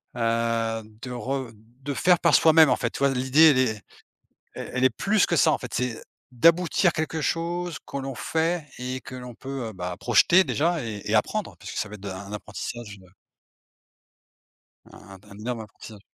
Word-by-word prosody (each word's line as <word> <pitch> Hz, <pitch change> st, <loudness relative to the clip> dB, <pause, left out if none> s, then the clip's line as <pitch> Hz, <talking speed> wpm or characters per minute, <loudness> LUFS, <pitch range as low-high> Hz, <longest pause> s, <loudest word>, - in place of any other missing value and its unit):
Heu, 115 Hz, -1 st, 0 dB, 0.2 s
de 125 Hz, -, -7 dB
re 130 Hz, 0 st, -4 dB
de 120 Hz, +6 st, -9 dB
faire 180 Hz, +4 st, +3 dB
par -, -, +3 dB
soi-même 160 Hz, -2 st, +6 dB
en -, -, +2 dB
fait, 115 Hz, -, -2 dB
tu -, -, -7 dB
vois? 140 Hz, -, +3 dB
L'idée 130 Hz, +5 st, +5 dB
elle 135 Hz, -, +3 dB
est 110 Hz, -5 st, +1 dB, 0.7 s
el -, -, -6 dB
elle 125 Hz, 0 st, 0 dB
est -, -, +6 dB
plus 200 Hz, -, +1 dB
que 170 Hz, -, +1 dB
ça 150 Hz, -, +4 dB
en -, -, 0 dB
fait, 125 Hz, -, -8 dB
c'est 125 Hz, -2 st, -2 dB, 0.3 s
d'aboutir 170 Hz, +7 st, +3 dB
quelque 160 Hz, 0 st, -2 dB
chose 170 Hz, +1 st, -2 dB
que -, -, -6 dB
l'on 135 Hz, -1 st, -5 dB
fait 165 Hz, +3 st, -1 dB
et 130 Hz, +1 st, -4 dB
que -, -, -11 dB
l'on 125 Hz, -1 st, -8 dB
peut, 135 Hz, -2 st, -6 dB
heu, -, -, -10 dB
bah, 90 Hz, -1 st, -5 dB
projeter 170 Hz, +10 st, +5 dB
déjà 165 Hz, -1 st, 0 dB
et 110 Hz, -3 st, -6 dB
et 105 Hz, -, -2 dB
apprendre. 195 Hz, -, 0 dB
Puisque -, -, -8 dB
ça 110 Hz, -, -2 dB
va 105 Hz, -, -11 dB
être 100 Hz, -, -15 dB
de 100 Hz, -, -6 dB
un 100 Hz, +2 st, -8 dB
apprentissage 105 Hz, +1 st, -7 dB
de 95 Hz, -, -18 dB, 1.9 s
un 95 Hz, -1 st, -13 dB
d'un 100 Hz, 0 st, -15 dB
énorme 115 Hz, +2 st, -4 dB
apprentissage. 110 Hz, 0 st, -12 dB
125 Hz, 195 wpm, -25 LUFS, 110-155 Hz, 1.9 s, soi-même